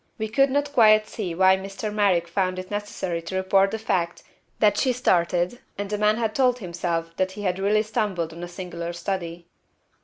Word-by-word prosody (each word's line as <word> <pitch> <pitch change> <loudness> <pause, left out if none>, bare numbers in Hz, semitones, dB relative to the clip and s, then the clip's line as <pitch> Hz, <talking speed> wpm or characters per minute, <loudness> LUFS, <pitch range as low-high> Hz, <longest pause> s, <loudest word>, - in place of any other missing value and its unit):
we 220 - -2
could 275 +5 +3
not 285 +1 -1
quite 215 -3 +5
see 185 -6 -4
why 190 +1 +5
Mr. 195 +2 -5
Merrick 190 -5 +2
found 185 +1 -1
it 185 +1 -7
necessary 205 -4 -3
to 165 +3 -6
report 195 +1 +3
the 220 - -3
fact 180 -6 -2 0.3
that: 210 -2 +4
"She 255 +4 +1
started, 180 -2 +1 0.2
and 205 0 -4
the 210 - 0
man 210 +1 +3
told 250 +1 +2
himself 170 -4 -3
that 185 0 0
he 205 - -7
had 185 -1 -1
really 210 +2 +2
stumbled 190 -7 -2
on 170 - -9
a 175 - -5
singular 175 -1 -6
study. 170 -1 -4
190 Hz, 190 wpm, -24 LUFS, 175-215 Hz, 0.3 s, quite